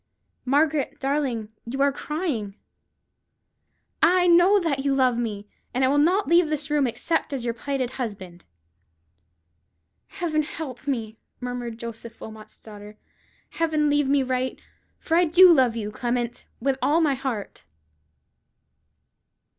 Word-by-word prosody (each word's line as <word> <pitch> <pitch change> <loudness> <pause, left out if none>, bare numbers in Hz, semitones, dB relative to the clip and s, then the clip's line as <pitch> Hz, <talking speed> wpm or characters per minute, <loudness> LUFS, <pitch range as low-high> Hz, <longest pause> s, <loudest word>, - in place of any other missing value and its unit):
"Margaret 290 +2 +1
darling, 270 -6 -1
you 245 +4 -6
are 280 - +3
crying. 275 - -4 1.5
Ah! 365 +1 +5
I - - +2
know 350 +4 +6
now 350 -4 -1
that 275 -2 -1
you 280 -1 +1
love 255 -2 +3
me, 210 -4 -4 0.3
and 260 +1 +3
I - - +2
will 290 +1 +3
not 365 +7 +2
leave 340 0 +4
this 305 -1 -2
room 290 -3 +2
except 310 +8 -2
as 255 -3 -3
your 235 - -1
plighted 260 +1 -3
husband." 190 -9 -7 1.6
"Heaven 315 -3 -1
help 290 -4 -7
me!" 225 -5 -3 0.2
murmured 245 -2 -5
Joseph 230 0 -9
Wilmot's 220 -1 -11
daughter; 210 -1 -12 0.5
"Heaven 310 -3 +1
lead 290 -1 +2
me 275 0 +3
right! 255 0 -2 0.4
for 325 - -1
I 350 +1 +5
do 355 +2 +7
love 255 -6 +3
you, 210 -2 -4
Clement, 240 +1 -3
with 270 +2 -1
all 310 +3 +3
my 305 -4 +2
heart." 255 -6 -5
265 Hz, 140 wpm, -24 LUFS, 235-305 Hz, 1.6 s, do